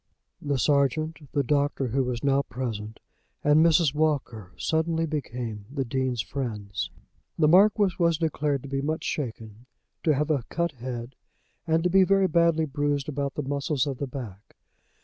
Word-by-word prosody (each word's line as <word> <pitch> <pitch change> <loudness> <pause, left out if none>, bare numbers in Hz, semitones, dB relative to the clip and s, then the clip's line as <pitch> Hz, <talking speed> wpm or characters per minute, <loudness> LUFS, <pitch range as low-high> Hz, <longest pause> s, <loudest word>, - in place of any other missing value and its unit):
The 145 -1 -1
sergeant, 150 +4 +1
the 140 - +1
doctor 140 -1 0
who 135 +4 +1
was 125 -2 -3
now 140 0 +3
present, 115 -5 -5 0.4
and 150 +2 +5
Mrs. 165 -3 +4
Walker 140 - -1
suddenly 160 - 0
became 120 -8 -4
the 135 -2 -2
Dean's 130 -2 -1
friends. 105 -7 -4 0.5
The 155 - +4
Marquis 200 +2 +5
was 170 -2 +3
declared 150 -4 -1
to - - -7
be 135 0 -1
much 155 +3 -2
shaken, 115 -4 -5 0.3
to 155 -3 +2
have 150 +3 0
a 145 -4 +1
cut 170 -1 -1
head, 125 -1 -6 0.5
and 160 0 +2
to 180 - +2
be 190 +1 +6
very 195 0 +3
badly 170 -1 +3
bruised 145 -1 -1
about 140 -1 -3
the 150 - -2
muscles 140 0 0
of 135 -3 -4
the 140 - -2
back. 115 -7 -9
140 Hz, 165 wpm, -26 LUFS, 125-160 Hz, 0.5 s, be